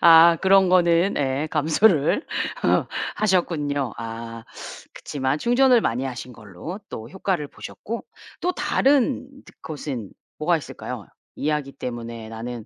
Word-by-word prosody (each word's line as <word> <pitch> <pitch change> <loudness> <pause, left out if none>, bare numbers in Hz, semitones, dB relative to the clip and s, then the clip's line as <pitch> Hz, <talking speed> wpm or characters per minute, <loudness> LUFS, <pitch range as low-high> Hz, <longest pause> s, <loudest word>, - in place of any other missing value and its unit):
아 165 0 +8
그런 190 -1 +5
거는 175 +1 +4
예 140 +2 0
감수를 160 - +3 0.9
하셨군요. 150 - 0
아 115 0 -7 0.5
그렇지만 135 +1 -2
충전을 245 - +4
많이 125 - -1
하신 125 -1 -6
걸로 105 - -8
또 110 +1 -7
효과를 185 -6 -2
보셨고 230 +2 -7 0.4
또 360 +1 +1
다른 270 -4 +2 0.2
드 - - -16
것은 140 -9 -5 0.3
뭐가 - - +2
있을까요? - - -7 0.3
이야기 150 -2 -1
때문에 115 -2 -6
나는 115 0 -6
150 Hz, 255 characters per minute, -23 LUFS, 120-190 Hz, 0.9 s, 아